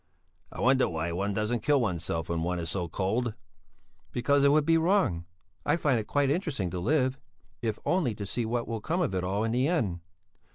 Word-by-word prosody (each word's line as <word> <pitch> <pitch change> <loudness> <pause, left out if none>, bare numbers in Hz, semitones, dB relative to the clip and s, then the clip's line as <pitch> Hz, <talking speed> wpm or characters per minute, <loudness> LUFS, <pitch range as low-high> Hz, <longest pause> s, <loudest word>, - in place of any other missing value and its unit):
"I - - -9
wonder 130 +1 +4
why 85 0 -2
one 100 +4 -1
doesn't 110 +2 0
kill 145 +4 +3
oneself 85 -7 -1
when 85 -1 -1
one 90 +2 -1
is 85 -1 -2
so 90 -3 -2
cold." 110 +7 -1 0.8
"Because 140 +3 +2
it 140 - +6
would 150 0 +4
be 165 0 +4
wrong. 160 - +2 0.4
I - - +2
find 145 -7 +2
it 105 - -5
quite 140 +1 +2
interesting 145 - -1
to 90 - -3
live, 130 - +1 0.4
if 110 -3 -1
only 160 - +1
to 100 - -5
see 120 +5 -2
what 115 +1 -2
will 115 -2 -3
come 170 +9 -1
of 160 - 0
it 90 -1 -1
all 100 +4 0
in 115 - 0
the 125 +3 +2
end." 110 - 0
115 Hz, 210 wpm, -28 LUFS, 95-140 Hz, 0.8 s, it